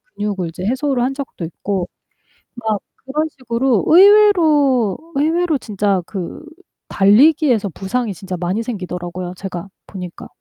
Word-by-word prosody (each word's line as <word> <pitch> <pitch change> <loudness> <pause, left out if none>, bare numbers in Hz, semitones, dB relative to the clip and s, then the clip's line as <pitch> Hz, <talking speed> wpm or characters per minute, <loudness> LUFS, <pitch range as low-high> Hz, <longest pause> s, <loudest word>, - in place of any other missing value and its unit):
근육을 195 -5 -3
이제 180 +3 -7
해소를 265 0 0
한 265 +2 0
적도 270 - -6
있고 180 +2 -3 0.7
막 220 -3 -2 0.3
그런 305 +4 -1
식으로 235 -2 0
의외로 320 - +5 0.2
의외로 320 +2 +1
진짜 200 -4 -1
그 190 - -6 0.4
달리기에서 235 - +4
부상이 210 +6 -3
진짜 185 +1 -6
많이 185 +6 -1
생기더라고요 180 -4 -5
제가 185 -1 -6 0.2
보니까. 180 -3 -8
220 Hz, 295 characters per minute, -18 LUFS, 185-280 Hz, 0.7 s, 의외로